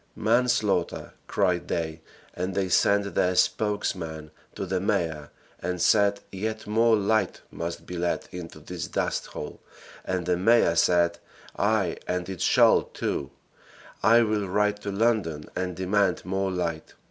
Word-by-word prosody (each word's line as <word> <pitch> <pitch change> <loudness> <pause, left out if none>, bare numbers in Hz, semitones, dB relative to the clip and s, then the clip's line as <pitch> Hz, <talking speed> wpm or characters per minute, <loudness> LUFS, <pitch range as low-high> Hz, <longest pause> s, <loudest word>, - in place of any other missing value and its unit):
"Manslaughter!" 110 -6 +1
cried 90 -3 0
they, 80 -1 -3 0.3
and 90 +2 -3
they 95 -2 0
sent 100 +3 +3
their 90 0 +2
spokesman 85 -8 -1 0.2
to 100 - -3
the 95 0 -1
mayor 80 -5 -1 0.3
and 90 -1 -3
said 100 +2 +3
yet 110 +3 -4
more 115 +2 +3
light 110 +1 0
must 85 0 -5
be 90 - -6
let 85 0 -1
into 90 -2 -8
this - - -6
dusthole, 75 - -3 0.4
and 95 -2 -2
the 90 0 +1
mayor 115 -1 +4
said, 85 0 +3 0.4
"Ay 105 -5 +1
and 90 -1 -2
it 95 -4 -6
shall, - - +5
too. 70 - -4 0.7
I 115 +2 +6
will 105 -2 0
write 105 +1 +1
to 100 - -4
London 100 -8 0
and 90 -1 -2
demand 95 0 +1
more 95 +1 -1
light." 85 -3 -3
95 Hz, 140 wpm, -26 LUFS, 85-105 Hz, 0.7 s, I